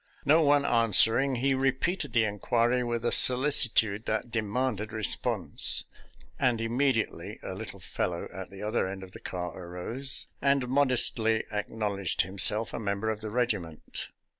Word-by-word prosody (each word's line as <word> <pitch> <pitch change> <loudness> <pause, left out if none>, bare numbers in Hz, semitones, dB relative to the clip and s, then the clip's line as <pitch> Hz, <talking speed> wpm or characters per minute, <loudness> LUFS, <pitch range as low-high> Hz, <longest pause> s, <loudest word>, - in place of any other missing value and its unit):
No 155 +3 +4
one 145 -1 +3
an 115 -4 +1
swering, 125 +5 +4
he 135 +1 +2
repeated 135 +4 -1
the 115 -1 +2
inquiry 120 +4 0
with 120 -1 -3
a - - +2
solici 130 0 +7
tude 110 -1 0
that 110 +2 -3
demanded 110 0 -2
response, 110 -1 +1 0.6
and 120 -3 +1
immediately 115 +1 -1
a - - -6
little - - -8
fellow 85 -1 -4
at 95 -1 -8
the 100 +1 -10
other 105 -2 -1
end 95 0 -7
of 95 - -12
the - - -11
car 90 -2 -6
arose, 95 +10 -3 0.2
and 140 -2 +1
modestly 120 -4 +1
acknowledged 105 -3 -1
himself 100 +4 +2
a - - -4
member 100 +1 -2
of 110 0 -6
the 110 - -6
regiment. 105 -9 -3
115 Hz, 155 wpm, -28 LUFS, 100-130 Hz, 0.6 s, solici